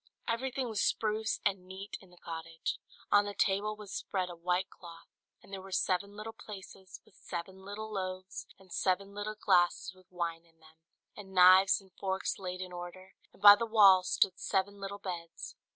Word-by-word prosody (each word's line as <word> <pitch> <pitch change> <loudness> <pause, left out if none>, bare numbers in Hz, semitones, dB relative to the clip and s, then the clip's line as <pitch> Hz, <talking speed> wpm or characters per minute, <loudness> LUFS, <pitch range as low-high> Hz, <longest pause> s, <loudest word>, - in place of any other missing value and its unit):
Everything 255 +2 -1
was 220 -3 -1
spruce 220 0 0
and 190 -2 0
neat 190 +2 -7
in 190 - -17
the 180 - -19
cottage: 165 -1 -5 0.3
on 205 0 +6
the 205 0 -5
table 205 +2 +1
was 210 -2 -11
spread 185 -2 -2
a - - -8
white 180 +2 0
cloth, 170 -2 -13 0.4
and 195 - -15
there 190 - -5
were 195 0 -11
seven 190 +2 0
little 215 +2 -7
plates 200 -4 -10 0.3
with - - -24
seven 185 +1 -7
little 215 +2 -6
loaves 185 -1 -5
and 190 -2 -14
seven 195 +1 0
little 205 +1 -4
glasses 180 -1 +2
with 185 -1 -22
wine 170 -2 -3
in 165 -1 -29
them; 160 0 -20 0.4
and 190 -2 -11
knives 185 +2 +7
and 190 -2 -20
forks 190 0 -2
laid 185 -1 -5
in 185 -1 -6
order, 175 +2 -9 0.2
and - - -22
by 205 0 +13
the 230 +2 -3
wall 200 -4 +7
stood 185 0 +1
seven 200 +1 -1
little 195 +1 -5
beds. 175 -4 -7
190 Hz, 185 wpm, -32 LUFS, 180-205 Hz, 0.4 s, by